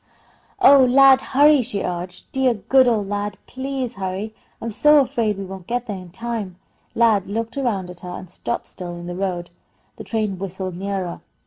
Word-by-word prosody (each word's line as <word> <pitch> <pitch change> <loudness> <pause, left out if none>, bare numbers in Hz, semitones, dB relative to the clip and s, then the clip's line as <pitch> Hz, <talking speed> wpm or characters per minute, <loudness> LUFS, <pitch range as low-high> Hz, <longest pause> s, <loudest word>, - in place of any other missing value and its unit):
"Oh, 280 -7 +7
Lad, 265 +1 +6
hurry!" 290 +1 +5
she 220 -4 -3
urged. 180 0 -6
"Dear, 265 -2 +2
good 260 +5 +3
old 215 -4 +1
Lad, 205 0 -3
please 260 -2 -4
hurry! 195 +3 -4 0.3
I'm 230 - -4
so 300 +7 +5
afraid 230 -6 0
we 195 - -5
won't 190 -2 -9
get 245 0 -2
there 210 -4 -4
in 180 -2 -9
time." 210 -1 -5 0.4
Lad 220 -5 +3
looked 225 +4 -3
around 230 -9 -1
at 180 - -5
her 180 - -8
and 185 +1 -7
stopped 235 +7 -4
still 175 -2 -8
in 175 0 -8
the 175 - -5
road. 175 -2 -3 0.5
The - - -7
train 215 -5 -2
whistled 190 -1 -5
nearer. 190 -2 -4
205 Hz, 185 wpm, -21 LUFS, 185-245 Hz, 0.5 s, Oh